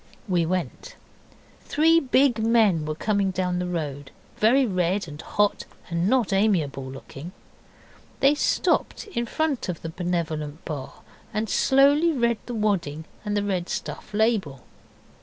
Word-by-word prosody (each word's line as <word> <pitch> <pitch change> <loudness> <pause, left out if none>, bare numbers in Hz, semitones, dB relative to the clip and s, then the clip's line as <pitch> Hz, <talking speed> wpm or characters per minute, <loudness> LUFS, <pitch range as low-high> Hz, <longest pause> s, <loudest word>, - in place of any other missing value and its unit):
We 175 -4 +1
went. 185 - -3 0.7
Three 325 +2 +4
big 260 -4 +3
men 220 -8 +3
were 155 - -2
coming 200 +3 0
down 180 -1 -1
the 180 - -2
road, 145 -5 -4 0.3
very 255 +5 +4
red 185 -2 0
and 150 0 -8
hot, 205 +4 0 0.3
and 170 +3 +1
not 240 -6 +2
amiable 165 -10 +1
looking. 135 +5 -9 0.9
They 275 +2 +5
stopped 300 - 0
in 240 - -3
front 305 -8 -1
of 175 - -5
the 165 - -4
Benevolent 160 -3 -3
Bar 145 -4 -5 0.4
and 215 +1 -2
slowly 285 - +4
read 235 -4 +1
the 245 - -4
wadding 175 -8 -1 0.2
and 205 -1 -1
red 185 -3 -2
stuff - - -5
label. 205 - 0
195 Hz, 140 wpm, -25 LUFS, 165-235 Hz, 0.9 s, They